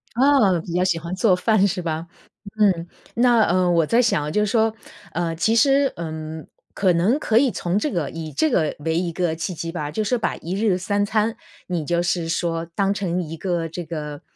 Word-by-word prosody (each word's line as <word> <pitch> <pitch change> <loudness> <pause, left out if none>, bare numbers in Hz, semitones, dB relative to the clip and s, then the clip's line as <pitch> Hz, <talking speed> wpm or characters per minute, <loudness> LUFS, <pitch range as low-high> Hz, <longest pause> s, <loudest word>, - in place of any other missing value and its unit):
哦， 235 - +4
比 170 - -6
较 180 +1 +2
喜 180 -2 +1
欢 170 +2 -6
做 190 -2 +3
饭 200 +1 +3
是 190 -1 -2
吧？ 165 -1 -3 0.5
嗯， 180 -5 +3 0.3
那， 240 -1 +4
呃， 180 0 +2
我 165 -2 +3
在 235 +7 +3
想 150 -11 0
就 210 +5 +2
说， 220 +1 +2 0.4
呃 165 -1 -1
其 220 +8 +1
实， 275 +3 +4
嗯， 160 -1 -6 0.3
可 190 -3 +2
能 185 +11 +2
可 225 -7 +1
以 270 0 +3
从 180 0 -1
这 300 - -1
个 170 -7 -2
以 160 -1 -6
这 315 - +1
个 155 -10 +1
为 160 +2 -1
一 175 -2 -2
个 170 -1 -1
契 165 +3 -4
机 165 +1 -4
吧， 150 -4 -4
就 190 +9 -2
是 245 +4 +1
把 225 - -1
1 170 - -5
日 200 -2 +1
3 200 +2 0
餐， 215 +1 0 0.3
你 175 -4 -2
就 170 +2 0
是 175 -1 -1
说 165 -1 -1
当 200 0 +1
成 180 -3 -2
一 160 +1 -7
个 175 -2 -2
这 170 +2 -6
个， 150 -3 -6
180 Hz, 215 characters per minute, -22 LUFS, 165-210 Hz, 0.5 s, 哦